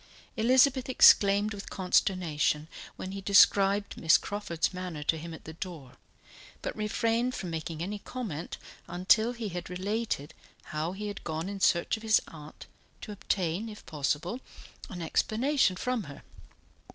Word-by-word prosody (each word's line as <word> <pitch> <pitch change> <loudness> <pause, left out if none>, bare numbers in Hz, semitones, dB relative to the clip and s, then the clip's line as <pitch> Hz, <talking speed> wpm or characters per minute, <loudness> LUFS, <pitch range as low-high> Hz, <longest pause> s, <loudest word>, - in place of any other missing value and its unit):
Elizabeth 255 +3 +4
exclaimed 205 -4 +6
with 200 0 -8
consternation 175 -5 +1 0.3
when 185 - -6
he 195 0 -6
described 200 0 +4
Miss 160 -2 +5
Crawford's 200 -5 -2
manner 180 -5 -5
to 160 - +2
him 165 +1 -7
at 160 - -10
the 160 - -8
door, 160 -7 -8 0.7
but - - -3
refrained 230 +3 0
from 180 -3 -5
making 160 0 -4
any 205 +3 -4
comment 200 -9 -6 0.3
until 205 +6 +3
he 235 -3 -5
had 175 -1 -6
related 190 -4 -3 0.4
how 155 +3 -2
he 210 +2 -6
had 205 -1 -6
gone 160 +1 -3
in 200 0 -5
search 170 +1 +2
of - - -12
his 220 -1 +4
aunt, 150 -1 -12 0.4
to - - -7
obtain, 195 0 -2
if 210 - -11
possible, 155 - -2 0.5
an 175 -2 -6
explanation 230 - +1
from 250 +4 -1
her. 140 -1 -11
190 Hz, 150 wpm, -29 LUFS, 165-215 Hz, 0.7 s, exclaimed